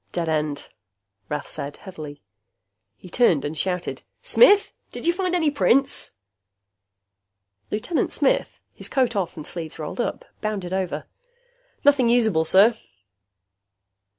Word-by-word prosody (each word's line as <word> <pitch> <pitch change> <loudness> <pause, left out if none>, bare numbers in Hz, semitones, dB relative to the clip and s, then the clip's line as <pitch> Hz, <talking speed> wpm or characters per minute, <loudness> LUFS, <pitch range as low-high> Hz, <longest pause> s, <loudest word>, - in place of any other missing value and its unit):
"Dead 170 -2 -2
end," 150 -2 -2 0.6
Rath 150 -1 -3
said 145 +1 -6
heavily. 155 -7 -10 0.7
He - - -13
turned 175 - +2
and 150 +2 -4
shouted, 180 +3 -2 0.2
"Smith! 410 -4 +5 0.2
Did - - -6
you 340 - +4
find 365 0 -1
any 320 -4 +2
prints?" 275 -1 +3 1.6
Lieutenant 235 +11 -1
Smith, - - 0
his - - -8
coat 255 -4 +1
off 190 -5 -2
and 155 - -7
sleeves 165 -3 -6
rolled 155 +10 -4
up, - - -4 0.2
bounded 200 -4 -3
over. 180 -6 -2 0.8
"Nothing 275 -4 +5
usable, 220 -9 +3
sir." 205 +7 +5
190 Hz, 125 wpm, -23 LUFS, 160-265 Hz, 1.6 s, Smith